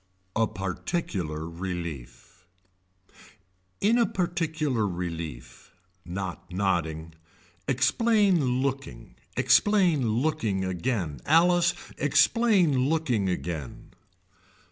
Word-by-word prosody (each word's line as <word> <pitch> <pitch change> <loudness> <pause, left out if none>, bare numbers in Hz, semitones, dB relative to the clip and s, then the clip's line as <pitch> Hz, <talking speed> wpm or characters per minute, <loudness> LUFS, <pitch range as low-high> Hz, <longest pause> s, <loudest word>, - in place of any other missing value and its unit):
A 115 0 +2
particular 90 - -3
relief 85 -4 -7 1.3
In 230 +4 +3
a 235 - +3
particular 160 - -1
relief. 85 -9 -6 0.3
Not 90 0 -6
nodding. 85 -4 -1 0.5
Explain 160 - +2
looking. 130 - -4 0.2
Explain 180 - +4
looking 115 -6 0
again. 95 - -2
Alice 175 +1 +4 0.2
explain 180 - +3
looking 125 -12 0
again. 85 -5 -5
110 Hz, 75 wpm, -27 LUFS, -, 1.3 s, Explain